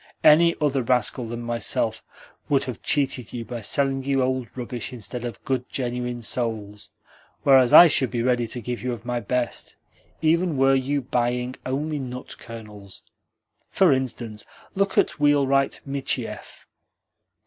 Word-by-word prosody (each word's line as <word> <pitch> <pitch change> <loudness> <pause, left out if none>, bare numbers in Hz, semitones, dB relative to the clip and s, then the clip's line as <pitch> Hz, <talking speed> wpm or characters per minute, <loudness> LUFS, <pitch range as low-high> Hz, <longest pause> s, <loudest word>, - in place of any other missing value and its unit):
Any 165 +2 +6
other 140 -3 +1
rascal 125 0 +1
than 120 +1 -5
myself 115 -1 -1 0.5
would 140 -2 +3
have 125 -2 -6
cheated 135 -5 0
you 120 -2 -5
by 120 -1 -6
selling 135 +4 0
you 135 -1 +1
old 130 -1 -1
rubbish 120 0 -5
instead 125 0 -7
of 120 -4 -7
good, 130 -2 -2
genuine 125 -1 -3
souls, 110 -3 -4 0.5
whereas 130 -3 +5
I 175 - +11
should 135 -6 +2
be 120 -2 -2
ready 125 -1 +1
to 120 +2 -6
give 120 +1 -4
you 125 0 -2
of 115 -1 -9
my 120 -1 -1
best, 120 +2 -3 0.4
even 165 0 +1
were 135 0 +4
you 135 +2 0
buying 125 0 -1
only 145 +3 -2
nut 125 -1 -7
kernels. 105 -4 -11 0.7
For 185 -7 +4
instance, 120 -5 -4 0.3
look 195 0 0
at - - +2
wheelwright 140 -2 +2
Michiev. 140 -1 -4
125 Hz, 150 wpm, -24 LUFS, 120-135 Hz, 0.7 s, I